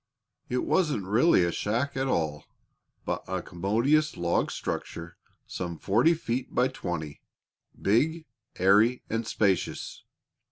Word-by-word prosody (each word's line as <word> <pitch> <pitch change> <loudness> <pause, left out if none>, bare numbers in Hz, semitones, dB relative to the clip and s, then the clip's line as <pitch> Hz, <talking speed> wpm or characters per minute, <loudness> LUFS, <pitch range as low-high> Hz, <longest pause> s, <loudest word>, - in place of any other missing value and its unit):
It 125 0 -1
wasn't 150 - +1
really 110 - +4
a 85 - +1
shack 120 +10 -1
at 135 0 0
all, 80 - -1 0.6
but - - -2
a 95 -1 -3
commodious 115 - +1
log 85 0 +1
structure 85 +1 -5 0.3
some 85 -2 -5
forty 120 - +3
feet 125 -4 -4
by 125 +1 +3
twenty 80 - -5 0.6
big, 155 +11 +1 0.3
airy, 105 +7 +4
and 115 0 -1
spacious. 100 -5 -1
110 Hz, 120 wpm, -27 LUFS, 90-130 Hz, 0.6 s, really